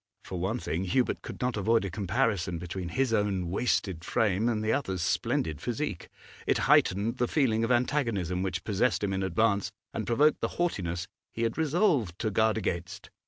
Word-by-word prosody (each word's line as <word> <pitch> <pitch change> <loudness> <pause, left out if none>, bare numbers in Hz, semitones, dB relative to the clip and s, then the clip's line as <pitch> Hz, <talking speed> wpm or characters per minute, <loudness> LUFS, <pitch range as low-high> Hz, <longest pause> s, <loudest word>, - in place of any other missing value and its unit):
For 90 - -5
one 95 +7 -1
thing, 95 -5 -2
Hubert 125 +8 +1
could - - -8
not 125 -1 0
avoid 110 +1 +2
a 95 - -4
comparison 100 -3 0
between 90 +1 -5
his 130 +6 0
own 100 -5 0
wasted 95 -5 0
frame 105 +3 +1
and 110 -2 -1
the 110 +1 +1
other's 95 - -1
splendid 80 -2 0
physique; 120 - -3 0.4
it - - +3
heightened 100 +5 +3
the 120 - +1
feeling 115 -7 +2
of 115 - +1
antagonism 115 - +1
which 95 -1 -2
possessed 110 +3 +1
him 100 -1 0
in 95 - -1
advance, 100 +1 +1 0.2
and 110 - -3
provoked 145 +6 +3
the - - -3
haughtiness 95 - -1 0.2
he 115 - -3
had 115 -1 0
resolved 155 - +1
to 110 0 -1
guard 110 +2 +2
against. 85 -5 -4
105 Hz, 180 wpm, -29 LUFS, 95-120 Hz, 0.4 s, it